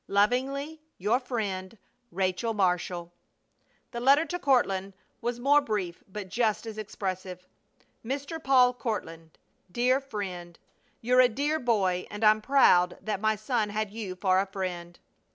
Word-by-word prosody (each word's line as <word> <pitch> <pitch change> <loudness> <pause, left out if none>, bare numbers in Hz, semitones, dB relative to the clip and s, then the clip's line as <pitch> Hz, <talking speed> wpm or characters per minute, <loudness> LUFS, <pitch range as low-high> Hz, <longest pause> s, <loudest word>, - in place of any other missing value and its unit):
Lovingly, 270 +9 0 0.2
your 215 +7 +1
friend, 210 -6 -4 0.3
RACHEL 190 +5 -1
MARSHALL. 180 -2 -1 0.8
The 235 - -4
letter 280 +6 +5
to 355 +1 -4
Courtland 200 - +1 0.3
was 240 +1 -2
more 285 +4 +4
brief, 205 -9 -3
but 200 0 -7
just 215 +2 0
as 220 -1 -7
expressive: 185 -3 -5 0.6
MR. 280 +6 -4
PAUL 255 -2 +5
COURTLAND: 165 - -5 0.3
DEAR 250 +4 +2
FRIEND. 185 -9 -6 0.4
You're 250 +2 +4
a 250 - +5
dear 290 +6 -1
boy 195 -8 0
and 210 +2 -6
I'm 215 0 +5
proud 180 -9 +4
that 210 -3 -3
my 215 0 +2
son 215 0 -1
had 210 0 -2
you 205 -4 -6
for 185 0 +2
a 195 - 0
friend. 180 -3 -5
215 Hz, 140 wpm, -28 LUFS, 185-250 Hz, 0.8 s, letter